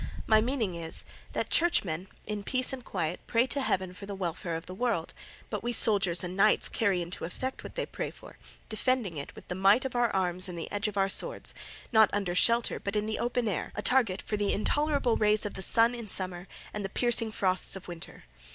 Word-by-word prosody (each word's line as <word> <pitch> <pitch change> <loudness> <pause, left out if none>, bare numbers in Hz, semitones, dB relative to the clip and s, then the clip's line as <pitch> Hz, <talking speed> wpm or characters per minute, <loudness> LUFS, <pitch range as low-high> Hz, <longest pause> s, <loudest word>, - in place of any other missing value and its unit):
My 215 -1 +5
meaning, 230 -5 -1
is, 165 -1 +1 0.3
that - - -2
churchmen 190 - +1 0.2
in 210 -1 -3
peace 255 +5 +1
and 255 -2 -6
quiet 175 -5 -3
pray 235 +1 +3
to 280 +2 -2
Heaven 185 -7 -1
for 200 +2 -10
the 200 - -5
welfare 170 -2 -3
of 165 - -6
the 185 - -8
world, 205 -5 -1 0.4
but - - -2
we 240 - -2
soldiers 195 -7 +3
and 180 +1 -4
knights 205 +2 +4
carry 195 -6 +1
into 170 +1 -6
effect 260 +10 -4
what - - -9
they - - -1
pray - - -4
for, - - -14 0.3
defending 220 -4 0
it 140 - -6
with - - -13
the - - -3
might 195 +7 +4
of 260 - -4
our 240 -1 +3
arms 185 -1 0
and 175 - -6
the 165 - -5
edge 205 +1 0
of 205 -1 -5
our 195 0 +3
swords, - - -3 0.4
not 220 -3 +6
under 200 -3 -1
shelter 235 +6 +3
but 200 +1 -4
in 210 0 +1
the 220 0 -3
open 240 -1 0
air, 200 - -2
a 210 - -4
target 230 -8 +2
for 210 - -2
the 205 -1 +1
intolerable 285 +2 +1
rays 210 0 +3
of 205 - -3
the 190 - -6
sun 230 +5 +6
in 235 -2 -5
summer 185 -1 -1 0.3
and 210 - -4
the 195 - -3
piercing 235 +1 +1
frosts 190 -3 0
of 190 0 -9
winter. 170 -2 -9
205 Hz, 225 wpm, -29 LUFS, 185-235 Hz, 0.4 s, not